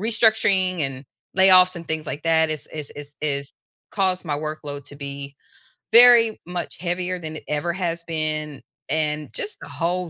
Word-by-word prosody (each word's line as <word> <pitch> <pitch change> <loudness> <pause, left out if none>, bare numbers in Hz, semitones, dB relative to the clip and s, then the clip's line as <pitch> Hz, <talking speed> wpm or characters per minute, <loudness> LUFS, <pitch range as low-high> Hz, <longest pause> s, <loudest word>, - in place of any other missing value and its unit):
restructuring 215 -5 +2
and 135 -1 -3 0.3
layoffs 185 -1 +6
and 170 -1 -8
things 160 -1 -3
like 145 - -5
that 160 -1 +2
is 155 -2 -4
is 150 -2 -7
is 145 0 -10
is 140 -2 -1 0.4
caused 185 -2 0
my 150 -2 -2
workload 150 -2 -6
to 145 - -7
be 140 0 -8 0.6
very 235 -2 +7
much 180 0 -5
heavier 180 0 -2
than 155 -1 -7
it - - -9
ever 155 +3 -1
has 170 -2 -2
been, 155 -3 -3 0.3
and 150 0 -1
just 425 - -3
a - - -9
whole 175 +1 -2
160 Hz, 165 wpm, -22 LUFS, 150-185 Hz, 0.6 s, very